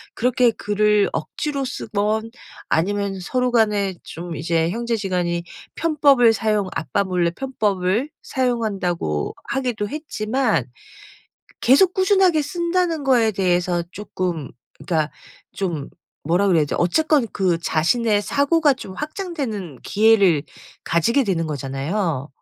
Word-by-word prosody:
그렇게 245 0 +3
글을 210 -1 +2
억지로 280 -3 -3
쓰든 220 -1 -2 0.4
아니면 200 +3 0
서로 250 +7 -1
간에 210 -5 +2
좀 170 0 -7
이제 165 +1 0
형제지간이 185 -6 -1 0.3
편법을 285 -7 +4
사용 215 -3 0
아빠 160 +6 -1
몰래 180 -3 0
편법을 210 - -1
사용한다고 200 - -1
하기도 245 -6 -2
했지만 250 - -1 1.0
계속 345 +9 +5
꾸준하게 375 -4 +3
쓴다는 340 0 -1
거에 245 -5 +4
대해서 180 -3 +1
쪼끔 180 -7 -4 0.3
그러니까 155 -3 0 0.4
좀 170 -7 -3 0.3
뭐라 175 +6 +2
그래야 170 -4 +4
되지? 145 - -4
어쨌건 290 - +2
그 185 -3 +1
자신의 205 +7 +1
사고가 285 +6 +2
좀 200 -7 -9
확장되는 280 - -5
기회를 200 -8 +4 0.4
가지게 230 - +2
되는 175 -6 0
거잖아요. 145 +2 -2
210 Hz, 275 characters per minute, -21 LUFS, 175-260 Hz, 1.0 s, 계속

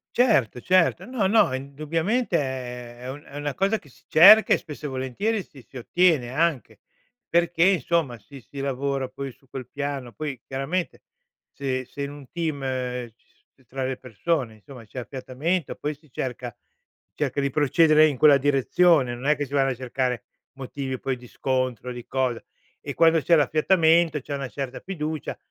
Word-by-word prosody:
Certo, 210 - +3
certo, 185 +2 +2
no, 240 -5 -1
no 210 -9 +4
indubbiamente 160 - -1
è 125 -3 -5
è - - -6
un 145 +2 -8
una 145 0 -4
cosa 200 +3 +1
che - - -20
si 130 - -21
cerca, 210 +7 +8
e - - +4
spesso 150 0 -8
e - - -5
volentieri 135 - -2
si 140 -6 -15
si 130 - -12
ottiene 150 -2 +2
anche, 145 -8 -1 0.5
perché 170 0 +2
insomma 170 -8 +1
si 130 +6 -13
si 140 +4 -11
lavora 135 0 -2
poi 135 +1 -6
su 135 +2 -26
quel 130 -1 -7
piano, 140 -4 -4
poi 140 +4 -5
chiaramente 135 +7 -3 0.5
se 130 -2 -3
se 140 - -9
in 140 - -4
un 145 -3 -12
team, 160 -4 -3 0.6
ci - - -35 0.3
tra 130 +2 -4
le 130 0 -2
persone 125 0 -2
insomma 120 +3 -13
c'è 125 - -8
affiatamento, 135 +7 -3
poi 150 +1 -3
si 150 -2 -26
cerca 125 -2 -4 0.6
cerca 145 -1 -2
di 140 0 +1
procedere 155 +2 +4
in 140 -4 -2
quella 145 -1 +7
direzione, 140 0 +3
non 130 +4 -5
è 150 -1 +3
che 145 - -2
si 140 - -12
vanno 135 -1 +3
a 130 - -2
cercare 125 -2 -2 0.3
motivi 130 -1 -5
poi 135 -1 -2
di 125 0 -14
scontro, 130 -2 -2
di 120 -1 -9
cosa. 130 -3 -1 0.4
E - - -5
quando 165 -1 +4
c'è 170 - +4
l'affiatamento, 160 +1 +3
c'è 145 +2 -7
una 135 -2 -4
certa 135 -2 -5
fiducia, 155 -5 -4
140 Hz, 175 wpm, -25 LUFS, 130-165 Hz, 0.6 s, cerca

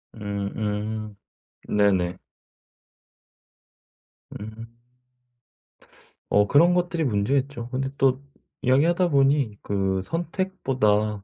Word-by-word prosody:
음음. 105 +1 -4 0.5
네네. 95 -3 +2 2.2
음. 115 +2 -10 1.5
어 105 0 +4
그런 170 - +5
것들이 175 -2 0
문제겠죠. 125 +3 -1
근데 135 +2 -2
또 135 0 +2 0.4
이야기하다 165 +8 +3
보니 140 -6 +2
그 95 -1 -1
선택보다 130 - -1
115 Hz, 160 characters per minute, -24 LUFS, 105-140 Hz, 2.2 s, 그런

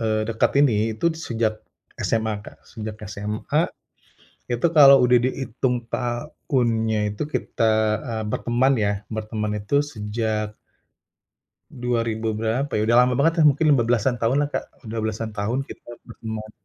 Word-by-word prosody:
eee, 110 -1 0
dekat 115 -1 +1
ini 110 -5 +2
itu 170 +7 +1
sejak 115 -8 -2 0.4
SMA 110 -2 0
Kak. - - -12
Sejak 110 -1 -7
SMA, 105 - -1 0.8
itu 120 +6 +1
kalau 140 -2 +9
udah 125 0 +5
dihitung 125 -1 -2
tahunnya 120 -4 -1
itu 105 - -3
kita, 115 -6 0 0.3
eee, 115 -3 -3
berteman 120 +5 +1
ya, 105 -2 +1 0.2
berteman 110 -1 -3
itu 105 +8 +1
sejak 110 -4 -3 1.2
dua 120 -1 -1
ribu 110 0 -3
berapa 115 +6 -1
ya, - - +1
udah 115 +2 +3
lama 125 0 +2
bangetlah, 165 +2 +3
mungkin 145 +3 0
15-an 120 -1 +2
tahunlah, 140 +6 +2
Kak. - - -2 0.2
Udah 110 +1 -5
belasan 110 0 -3
tahun 115 +6 -1
kita 120 0 -11
berteman. 110 -1 -7
115 Hz, 135 wpm, -23 LUFS, 110-130 Hz, 1.2 s, kalau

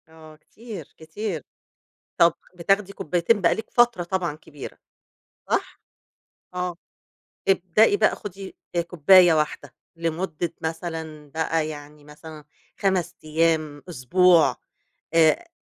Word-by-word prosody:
آه 160 -1 -15
كتير 205 - -11
كتير، 160 +1 -5 0.7
طب 170 -1 +5 0.2
بتاخدي 195 +3 +1
كوبايتين 180 +6 +1
بقى 170 - +4
لِك 220 - -7
فترة 240 -6 +3
طبعًا 175 -3 -2
كبيرة، 150 -2 -11 0.7
صح؟ - - -1 0.7
آه، 180 -1 -3 0.7
ابدئي 195 +3 +3
بقى 215 - +3
خدي 195 -1 -9 0.2
آآ 170 - +3
كوباية 175 +1 +5
واحدة 150 -4 -2 0.2
لمدة 165 0 -3
مثلًا 160 -2 -5
بقى 160 0 -1
يعني 150 -1 -10
مثلًا 150 +1 -12 0.3
5 190 -4 0
أيام، 155 -1 0
أسبوع، 175 +3 +4 0.6
آآ، 165 - +4
165 Hz, 110 wpm, -24 LUFS, 155-185 Hz, 0.7 s, طب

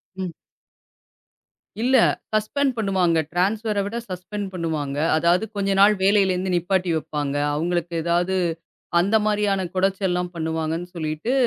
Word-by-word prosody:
ம். 185 -2 -4 1.5
இல்ல, 255 +2 +3 0.4
சஸ்பெண்ட் 260 +6 +1
பண்ணுவாங்க. 190 -6 +2 0.2
டிரான்ஸ்ஃபர 205 +4 0
விட 205 - -5
சஸ்பெண்ட் 190 +3 -5
பண்ணுவாங்க. 155 -5 -3 0.2
அதாவது, 170 +5 +3
கொஞ்ச 195 -1 0
நாள் 205 +2 +7
வேலையில 195 -1 +4
இருந்து 185 0 -2
நிப்பாட்டி 180 0 0
வைப்பாங்க. 145 -2 -3 0.2
அவங்களுக்கு 170 +1 -1
ஏதாவது 175 +3 +1 0.6
அந்த 200 +5 +2
மாரியான 205 -2 +1
கொடச்சல் 195 +1 +1
எல்லாம் 180 0 -1
பண்ணுவாங்கன்னு 160 +1 -2
சொல்லிட்டு, 155 +8 -2
185 Hz, 120 wpm, -23 LUFS, 170-200 Hz, 1.5 s, நாள்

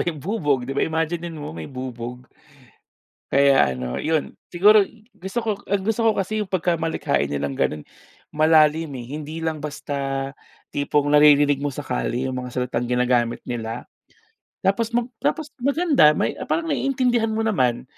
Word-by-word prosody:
yung 165 - -3
bubog, 150 - 0
'di 135 - -4
ba, 140 - -1
imaginin 165 +1 -2
mo 150 - -6
may 80 -1 -7
bubog. 125 -1 -7 1.0
Kaya 135 - +4
ano, 65 -1 -4
yun, 155 -1 -1 0.2
siguro 205 +5 +6 0.3
gusto 195 +2 -5
ko 225 - 0 0.2
ang 200 0 0
gusto 225 +2 0
ko 220 - +2
kasi 215 +3 -1
yung 210 - -3
pagkamalikhain 165 - 0
nilang 70 -1 -2
ganun, 75 0 0 0.5
malalim, 155 +1 +4
eh. 120 -2 -7
Hindi 155 +2 -6
lang 160 -1 -1
basta 140 -2 -3 0.4
tipong 145 0 0
naririnig 145 -1 +6
mo 145 - -1
sa - - -6
kalye 120 - -2
yung 130 - -3
mga 125 - -6
salitang 125 -1 -2
ginagamit 125 -1 +1
nila. 115 0 -5 0.8
Tapos 200 +4 +2
mag 240 +1 -1
tapos 310 -2 -1
maganda 280 - +4
may - - -1
parang 330 -1 0
naiintindihan 250 -5 +1
mo 220 0 -1
naman, 130 - +1
150 Hz, 155 wpm, -23 LUFS, 125-195 Hz, 1.0 s, siguro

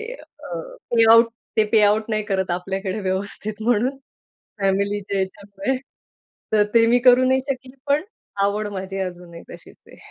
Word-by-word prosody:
अ, - - -12 0.4
payout, 230 +1 +7 0.3
ते 215 - +6
payout 215 0 +3
नाही 215 -1 0
करत 190 -3 -1
आपल्याकडे 190 +3 -3
व्यवस्थित 200 +3 -4
म्हणून, 245 +4 +1 0.6
फॅमिलीच्या 200 0 0
याच्यामुळे. 200 +8 -3 0.8
तर 210 -1 +5
ते 230 0 +6
मी 245 +2 +4
करू 255 +1 +5
नाही 260 +1 +3
शकली. 260 0 -5
पण 285 +3 +2 0.4
आवड 205 +1 0
माझी 195 0 -5
अजूनही 175 -2 -6
तशीच - - -13
आहे. - - -16
210 Hz, 135 wpm, -22 LUFS, 195-230 Hz, 0.8 s, payout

